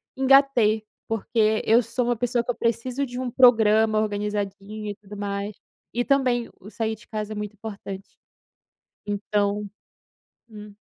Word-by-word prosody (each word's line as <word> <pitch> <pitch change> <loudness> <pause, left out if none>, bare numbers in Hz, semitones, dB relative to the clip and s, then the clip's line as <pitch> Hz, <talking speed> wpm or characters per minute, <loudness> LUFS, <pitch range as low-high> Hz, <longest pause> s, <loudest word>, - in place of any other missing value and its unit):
engatei, 265 -5 +4 0.2
porque 220 0 +1
eu 230 +2 +5
sou 240 +2 -2
uma 240 0 +1
pessoa 240 +1 0
que 245 - -1
eu - - -7
preciso 240 +4 -1
de 245 -1 -6
um 255 -1 -3
programa 220 -3 +5
organizadinho 210 0 -3
e - - -7
tudo 205 +1 -12
mais. 200 0 -3 0.4
E 245 +1 0
também 255 -4 +2
o 200 - -12
sair 220 0 -2
de 220 - -19
casa 215 -1 -4
é - - -7
muito 210 0 -5
importante. 200 -2 -7 1.0
Então, 205 0 -1 0.8
hum. 210 -2 -11
215 Hz, 150 wpm, -24 LUFS, 210-240 Hz, 1.0 s, eu